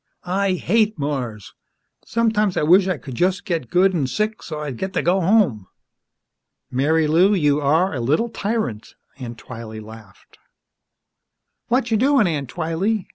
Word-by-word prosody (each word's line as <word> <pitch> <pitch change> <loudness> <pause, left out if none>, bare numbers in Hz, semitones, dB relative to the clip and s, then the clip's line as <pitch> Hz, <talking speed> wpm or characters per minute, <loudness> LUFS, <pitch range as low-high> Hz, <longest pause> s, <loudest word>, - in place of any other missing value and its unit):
I 190 +2 0
hate 215 +4 +1
Mars! 130 -8 -4 0.5
Sometimes 220 -4 +1
I - - +1
wish 180 +5 +5
I 185 -4 0
could 130 0 -9
just 185 +8 0
get 165 - -2
good 190 +2 +3
an' 150 -7 0
sick, 215 +9 -2
so's 150 -2 -6
I'd 135 -6 -6
get 190 0 -4
to - - 0
go 185 +3 +2
home!" 170 - +2 1.1
"Marilou, 160 +8 +3
you 145 -1 +2
are 160 +7 +2
a 130 - -3
little 150 - +1
tyrant!" 210 - -3 0.2
Aunt 120 -2 -7
Twylee 115 -3 -9
laughed. 110 -3 -14 1.3
"Watcha' 235 -3 +1
doin', 270 -2 +4
Aunt 145 -7 -2
Twylee?" 175 - -2
170 Hz, 145 wpm, -21 LUFS, 135-200 Hz, 1.3 s, wish